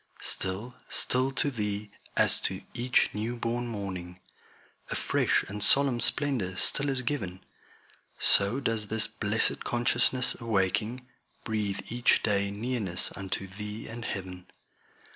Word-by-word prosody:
Still, 95 +7 -2 0.2
still 130 +1 +4
to 140 +2 +2
Thee, 105 -3 -6 0.3
as - - +4
to - - -4
each 125 +2 -1
new 110 +3 -5
born 120 +1 -5
morning, 95 -5 -8 0.7
A - - -5
fresh - - -1
and 105 +1 -8
solemn 135 0 +3
splendor 120 -10 +2
still 145 +8 +5
is 130 -1 -2
giv'n, 95 -9 -5 0.8
So 100 +6 +3
does 115 -5 -2
this 110 +1 +3
blessed 110 0 +1
consciousness 120 +1 +5
awaking, 110 +3 -3 0.4
Breathe 105 -3 -4
each 120 0 0
day 100 -2 -1
nearness 105 -4 -2
unto 95 0 -6
Thee 105 +3 -8
and 120 +1 -9
heav'n. 90 -3 -8
110 Hz, 125 wpm, -26 LUFS, 100-120 Hz, 0.8 s, still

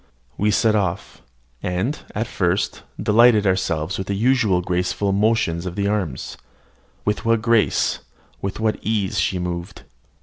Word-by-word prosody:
We 105 - +1
set 110 +1 +3
off, 95 -3 -2 0.4
and, 95 +11 -2 0.2
at 110 +3 0
first, 95 -1 -1 0.2
delighted 110 -1 +5
ourselves 95 -2 0
with 95 - -4
the 100 - -1
usual 110 -4 +2
graceful 90 +3 -1
motions 100 -4 +1
of 90 - -5
the 100 -1 0
arms. 95 -10 -2 0.7
With 105 +2 0
what 115 -1 +2
grace, 115 -2 +2 0.4
with 100 +1 -4
what 110 -1 0
ease, 105 -2 -1
she 95 +1 0
moved! 90 -1 -5
100 Hz, 140 wpm, -21 LUFS, 90-110 Hz, 0.7 s, delighted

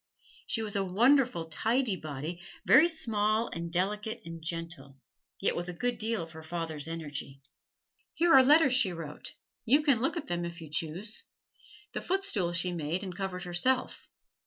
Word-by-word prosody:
She 225 - -1
was 210 -2 -4
a 200 - +2
wonderful 230 - +3
tidy 225 +7 0
body, 155 +1 -6 0.2
very 260 - +7
small 220 -8 +1
and 170 0 -5
delicate 210 +5 -1
and 165 0 -8
gentle, 165 -5 -5 0.4
yet 195 - +1
with 175 +1 -3
a - - -4
good 245 +6 -2
deal 220 -4 -1
of 165 - -10
her 160 0 -10
father's 160 -2 -4
energy. 145 -4 -6 0.8
Here 340 0 +4
are 265 - +10
letters 285 0 +5
she 250 -8 +3
wrote: 160 -3 -8 0.3
you 285 +6 +4
can 275 -7 +3
look 270 +6 0
at 325 - -4
them 175 0 -2
if 170 0 -6
you 160 -3 -10
choose. 170 +8 -4 0.7
This - - -5
footstool 355 - 0
she 175 +1 +1
made 170 +3 -2
and 185 -2 -6
covered 190 -1 -4
herself. 195 +9 0
185 Hz, 170 wpm, -30 LUFS, 165-235 Hz, 0.8 s, are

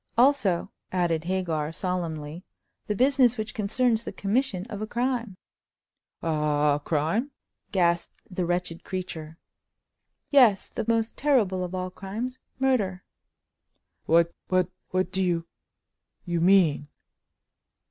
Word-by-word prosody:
"Also," 235 -9 +3 0.2
added 170 -3 0
Hagar, 170 -5 -1
solemnly, 165 -2 -3 0.4
"the 210 - 0
business 255 0 +4
which 215 0 -4
concerns 230 +1 +1
the - - -5
commission 200 -3 -1
of 210 -3 -7
a 215 - -3
crime." 240 -4 -1 0.9
"A—a—a 150 -2 +2
crime!" 165 - 0 0.4
gasped 170 -3 +1
the 180 -1 -3
wretched 175 -1 -2
creature. 165 -4 -5 0.9
"Yes—the 240 -8 +4
most 230 -1 +1
terrible 215 -11 +2
of 180 +1 -4
all 185 0 -3
crimes—murder!" 225 -1 -2 1.0
"What—what—what 180 +2 +1
do 190 - -1
you—you 170 0 -5
mean?" 170 -5 +4
185 Hz, 95 wpm, -26 LUFS, 170-225 Hz, 1.0 s, business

